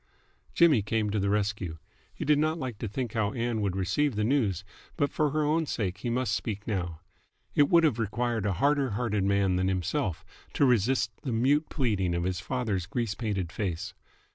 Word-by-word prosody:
Jimmy 155 -9 +5
came 105 0 -1
to 105 - 0
the 100 0 0
rescue. 100 -5 -1 0.3
He - - -6
did 150 0 +4
not 155 +2 +1
like 125 -9 -5
to 115 - -3
think 120 +2 -4
how 110 -3 0
Ann 115 -2 -1
would 100 -3 -1
receive 100 +8 0
the 105 - 0
news, 105 - +1 0.3
but 145 -3 +1
for 150 -1 +1
her 155 +2 0
own 155 +2 +1
sake 100 -6 -2
he 120 - -3
must 125 +2 0
speak 105 -2 -3
now. 90 -7 -3 0.5
It 145 -1 +4
would 170 -1 +5
have 140 -8 +2
required 115 -1 -1
a 100 - +1
harder 140 +6 +2
hearted 105 -5 0
man 100 -2 +2
than 95 +1 +1
himself 95 - -1 0.3
to 145 - +3
resist 120 0 +2
the 130 - -3
mute 135 +7 +2
pleading 100 - 0
of 85 - -1
his 90 -1 -1
father's 105 -4 -2
grease 115 -2 -2
painted 100 -7 -3
face. 90 -5 -3
110 Hz, 195 wpm, -28 LUFS, 95-130 Hz, 0.5 s, Jimmy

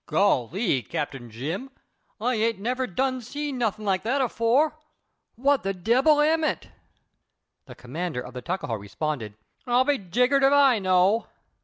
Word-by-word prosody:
"Golly, 180 - +1
Cap. 145 - -3 0.2
Jim, 155 - -5 0.5
I 245 +4 0
ain't 225 -1 0
never 250 +5 -2
done 255 +6 -1
seen 285 +2 -5
nuthin' 215 -2 -1
like 190 -2 +1
that 245 +7 0
afore. 260 +5 +1 0.6
What 275 +3 +2
the 195 0 -2
debbil 260 - +3
am 320 +2 +2
it?" 310 - -2 1.0
The - - -11
commander 150 +3 -5
of 125 - -10
the 125 - -6
Tuckahoe 180 -7 -3
responded: 105 +2 -4 0.3
"I'll 245 +1 +4
be 280 0 +1
jiggered 250 +9 +2
if 270 0 +5
I 275 -5 +5
know." 185 +3 +2
225 Hz, 150 wpm, -25 LUFS, 180-265 Hz, 1.0 s, if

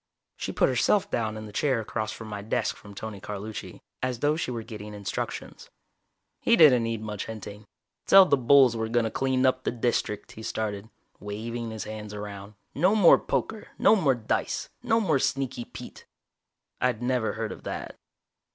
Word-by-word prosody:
She - - -4
put - - +3
herself 195 +11 +2
down 110 -2 -1
in 110 - -7
the 105 - -10
chair 130 +3 +1
across 110 0 -4
my 105 -2 -6
desk 105 - -1
from 100 0 -13
Tony 105 -1 -7
Carlucci, 105 +2 -7 0.2
as 130 -1 -1
though 145 +5 +2
she 160 - -2
were 115 -2 -4
getting 105 -1 -8
instructions. 100 -2 -5 0.7
He 235 - +4
didn't 145 - +7
need 115 -1 -2
much 105 -2 -5
hinting. 105 -1 -8 0.4
"Tell 195 -1 +9
the 145 - +4
bulls 130 -1 +5
we're 110 0 -2
gonna 115 -1 +1
clean 130 -1 +1
up 130 0 +2
the - - 0
District," 120 -3 -1
he 110 - -10
started, 110 -1 -3 0.3
waving 115 +3 -5
his 110 -1 -5
hands 105 -1 -7
around. 105 0 -8 0.2
"No 185 +8 +3
more 200 -6 +7
poker. 220 -1 -2
No - - +6
more 145 -10 +3
dice. 115 -2 -2
No 230 -2 +2
more 160 -10 +2
Sneaky 130 -3 -1
Pete." - - -11 0.7
I'd 125 -2 +1
never 125 -2 0
heard 110 0 -3
of - - -8
that. - - -5
115 Hz, 175 wpm, -27 LUFS, 105-130 Hz, 0.7 s, Tell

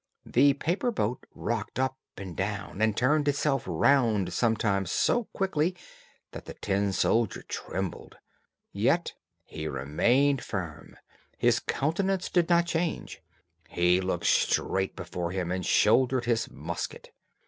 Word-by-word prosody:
The 140 +3 +4
paper 170 - -1
boat 125 - -2
rocked 115 -2 -3
up 130 0 -1 0.2
and 95 -3 -7
down, 100 +1 -4
and 110 -1 +2
turned 145 +4 +2
itself 140 -2 +1
round 110 - +2
sometimes 105 -5 +1
so 240 -2 +2
quickly 180 -3 -1 0.6
that - - -9
the - - -9
tin 100 0 0
soldier 110 +2 +1
trembled; 95 -1 -5 0.5
yet - - +1 0.3
he 80 0 -6
remained 120 - +1
firm; 85 -7 -6 0.4
his - - +3
countenance 185 +5 -1
did 175 -2 +2
not 170 0 +4
change; 170 -1 -3 0.5
he 90 +1 +2
looked 90 -2 -2
straight 95 0 +1
before 85 -1 -4
him, 90 -2 -2
and 90 0 -2
shouldered 125 +3 +3
his 115 -2 0
musket. 80 +5 -6
115 Hz, 125 wpm, -28 LUFS, 95-145 Hz, 0.6 s, The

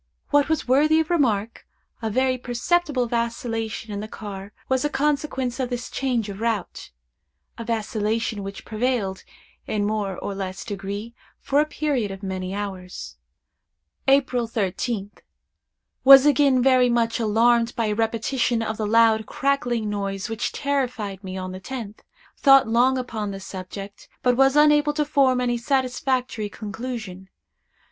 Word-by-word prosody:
What 290 0 +3
was 315 -4 0
worthy 300 +5 +4
of 320 +2 -1
remark, 230 -9 0 0.3
a 225 - -1
very 255 +3 +1
perceptible 255 +3 0
vacillation 230 -2 -3
in 200 - -3
the 215 - -5
car 200 -2 -8 0.2
was 260 0 +1
a 295 - +1
consequence 280 -3 -1
of 255 -2 -1
this 245 -1 -5
change 245 -5 -1
of 200 -1 -7
route—a 175 - -6
vacillation 220 -1 -1
which 195 0 -8
prevailed, 215 -4 -1 0.4
in 210 -1 -1
a - - 0
more 205 -3 -2
or 200 - -4
less 190 -1 -5
degree, 205 +3 -5 0.3
for 280 +1 +1
a 305 - 0
period 285 -8 -1
of 195 +1 -8
many 185 -1 -4
hours. 190 -3 -6 0.9
"April 270 -3 +3
13th. 205 0 -3 0.8
Was 270 0 +10
again 275 -3 +4
very 255 -2 +5
much 230 -1 +1
alarmed 230 +2 +3
by 230 - 0
a 210 - 0
repetition 230 +2 0
of 220 -1 -3
the 215 - -2
loud, 220 0 +4
crackling 245 -5 0
noise 200 0 -3
which 225 -1 -2
terrified 250 -9 -2
me 190 0 -6
on 185 0 -5
the 185 - -7
tenth. 225 -1 -7 0.4
Thought 270 -3 +6
long 245 +4 +3
upon 225 -5 -3
the 195 -1 -6
subject, 195 +1 -8
but 250 -1 +3
was 270 +2 +4
unable 295 0 +5
to 300 0 0
form 275 -4 +3
any 240 -1 0
satisfactory 255 -3 -1
conclusion. 210 -3 -7
230 Hz, 150 wpm, -23 LUFS, 205-260 Hz, 0.9 s, Was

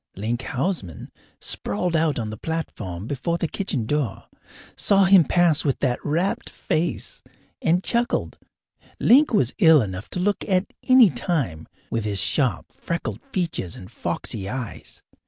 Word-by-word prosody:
Link 115 +5 -2
Houseman, 130 - -3 0.3
sprawled 170 +12 -1
out 160 -2 +2
on 110 -3 -3
the - - -5
platform 105 - -5
before 170 +7 -2
the 170 - -1
kitchen 150 - -2
door, 135 -5 -2 0.5
saw 195 -1 +4
him 190 -2 +7
pass 165 0 +3
with 140 -4 0
that 125 -3 -1
rapt 170 +6 -1
face, 165 +2 -2 0.4
and 175 +3 +2
chuckled. 240 0 -1 0.6
Link 285 +5 +5
was 135 - +2
ill 160 -2 +7
enough 95 -4 -4
to - - -4
look 200 +3 0
at 185 0 +1
any 255 -7 +7
time, 125 - -2 0.2
with 115 -1 -1
his 105 -2 0
sharp, 85 - +1
freckled 170 0 -4
features 165 - -2
and 95 - -11
foxy 95 -1 -4
eyes. 125 -2 -6
155 Hz, 145 wpm, -23 LUFS, 110-180 Hz, 0.6 s, him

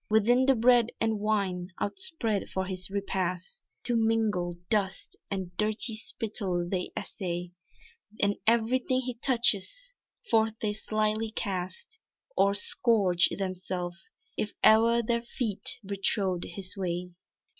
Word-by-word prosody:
Within 240 +5 +4
the 270 - +5
bread 240 0 +5
and 220 -1 0
wine 200 -4 0
outspread 230 - -1
for 190 0 -2
his 185 0 -2
repast 195 - -3 0.2
To 240 - +3
mingle 220 -6 +1
dust 195 -3 0
and 185 -3 -4
dirty 215 +2 +3
spittle 205 -6 -2
they 180 0 -2
essay, 175 -2 -4 0.7
And 200 0 +2
everything 250 +3 +2
he 250 -1 -3
touches, 245 - +2 0.4
forth 220 -1 +3
they 210 -1 -1
slyly 215 +1 -1
cast, 195 - -4 0.4
Or 200 0 +3
scourge 200 -4 +3
themselves, 185 -2 -4 0.3
if 210 - -3
e'er 230 +2 +6
their 235 +1 0
feet 230 -3 -3
betrod 195 -2 0
his 185 -2 -5
way. 180 -2 -3
210 Hz, 120 wpm, -28 LUFS, 185-230 Hz, 0.7 s, e'er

